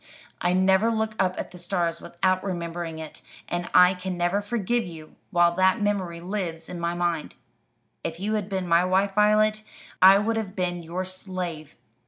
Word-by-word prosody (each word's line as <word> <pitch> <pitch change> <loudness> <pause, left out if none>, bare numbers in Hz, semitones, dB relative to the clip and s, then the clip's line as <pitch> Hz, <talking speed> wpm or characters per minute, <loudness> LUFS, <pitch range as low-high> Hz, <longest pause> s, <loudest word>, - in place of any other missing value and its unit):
I 175 - +2
never 190 +4 +4
look 220 -1 -1
up 185 -1 +1
at - - -5
the 180 - -11
stars 175 -2 -1
without 185 +1 0
remembering 170 -3 -4
it; 160 -1 -9 0.3
and 175 0 -3
I 180 +1 +7
can 180 0 -5
never 175 +4 +1
forgive 235 +2 -1
you 160 -3 -10
while 175 -2 +3
that 190 +4 +3
memory 195 -5 -1
lives 175 -3 -4
in 175 - -7
my 170 0 -1
mind. 175 -3 -2 0.7
If 165 +1 -4
you 210 +3 -1
had 210 -2 -2
been 190 -2 -2
my 170 +1 +4
wife, 190 +2 +1
Violet, 215 +1 +3 0.4
I 190 +1 +9
would 225 +3 0
have 205 -3 -4
been 175 -2 -2
your 175 +3 -4
slave. 180 -5 -6
185 Hz, 180 wpm, -25 LUFS, 175-200 Hz, 0.7 s, I